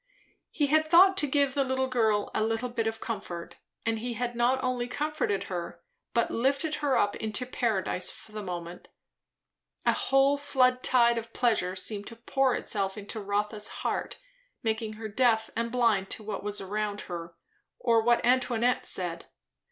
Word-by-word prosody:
He 295 - +1
had 310 +2 +2
thought 375 +3 +7
to 295 - +3
give 280 -1 +2
the 265 -2 +1
girl 220 -5 +1
a - - 0
little 225 +3 -1
bit 230 -2 -1
of 225 0 -3
comfort; 195 -7 -6 0.3
and 225 -1 0
he 240 +1 -4
had 240 +1 -2
not 250 +3 +2
only 250 -1 -1
comforted 290 -7 -1
her, 175 -2 -6 0.3
but 235 - +2
lifted 275 +6 0
her 285 -3 +2
up 205 0 +2
into 220 +3 -2
paradise, 215 -7 -1
for 215 - -11
the 215 0 -5
moment. 175 -2 -6 1.0
A - - +4
whole 270 +1 +3
flood 255 -3 +2
tide 235 -2 +4
of 230 - -11
pleasure 220 -7 +1
seemed 205 +2 -3
to 230 - -7
pour 260 +3 +1
itself 195 -1 -2
into 210 +2 -5
Rotha's 210 +1 -1 0.2
heart, - - -2 0.5
making 220 -1 -1
her 220 +1 -6
deaf 225 0 +2
and 230 0 -1
blind 230 -6 +2
to 220 - -5
what 205 -2 -4
was 205 0 -2
around 205 +1 -3
her 170 -1 -7 0.4
or 230 -2 +3
what 240 +1 +3
Antoinette 245 -1 +2
said. 170 -2 -2
230 Hz, 165 wpm, -28 LUFS, 205-255 Hz, 1.0 s, thought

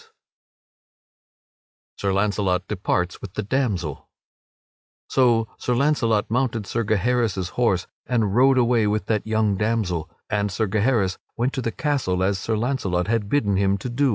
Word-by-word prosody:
[Sidenote: - - -24 1.8
Sir 100 -1 0
Launcelot 100 -2 0
departs 90 -3 -1
with 100 -1 -9
the 105 - -2
damsel] 100 - -2 1.0
So 120 -4 +3
Sir 125 - 0
Launcelot 120 -6 +2
mounted 120 -2 0
Sir 115 +3 -1
Gaheris' 110 -3 0
horse 95 -4 +1 0.2
and 110 -5 +1
rode 130 +2 +5
away 120 -3 +3
with 105 -2 0
that 110 0 -1
young 110 -2 +1
damsel, 95 -6 -1 0.2
and 105 -1 -1
Sir 110 +4 0
Gaheris 105 -2 +1 0.2
went 120 +4 0
to 130 - -2
the 115 - -2
castle 125 - -1
as 95 0 +1
Sir 110 +3 -1
Launcelot 105 -8 -1
had 110 -3 0
bidden 105 -8 +1
him 100 0 +2
to 115 +6 -5
do. 135 +3 +2
110 Hz, 155 wpm, -23 LUFS, 95-120 Hz, 1.8 s, rode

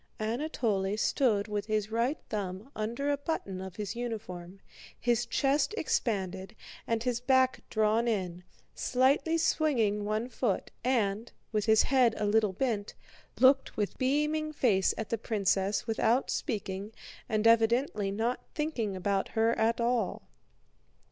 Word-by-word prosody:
Anatole 215 -4 -1
stood 220 -3 +1
with 210 -1 -3
his 215 -1 -1
right 235 +6 +1
thumb 200 +4 -4
under 235 +7 -2
a 285 - +1
button 235 - -4
of 190 -2 -8
his 205 -1 -4
uniform, 200 -6 -6 0.4
his 240 -1 +1
chest 280 +6 +1
expanded 195 - -2 0.3
and 230 -1 0
his 245 -1 0
back 260 0 +3
drawn 220 +2 +2
in, 180 -5 -2 0.3
slightly 275 +6 +2
swinging 235 -11 +1
one 215 +3 -1
foot, 240 -5 -2
and, 225 -3 0 0.2
with 210 -2 0
his 220 0 +5
head 255 -4 +3
a 210 - -1
little 210 -1 +2
bent, 210 -2 -2 0.4
looked 265 +1 +4
with 210 -2 -2
beaming 300 +3 +1
face 215 -10 +2
at 220 - -4
the 230 - -1
princess 200 -2 0
without 230 +3 +1
speaking 200 -5 -3 0.4
and 215 -1 0
evidently 230 -2 +3
not 225 +5 -1
thinking 250 -10 -2
about 195 +1 0
her 225 0 +2
at 230 +1 +1
all. 235 -4 0
225 Hz, 135 wpm, -30 LUFS, 205-255 Hz, 0.4 s, his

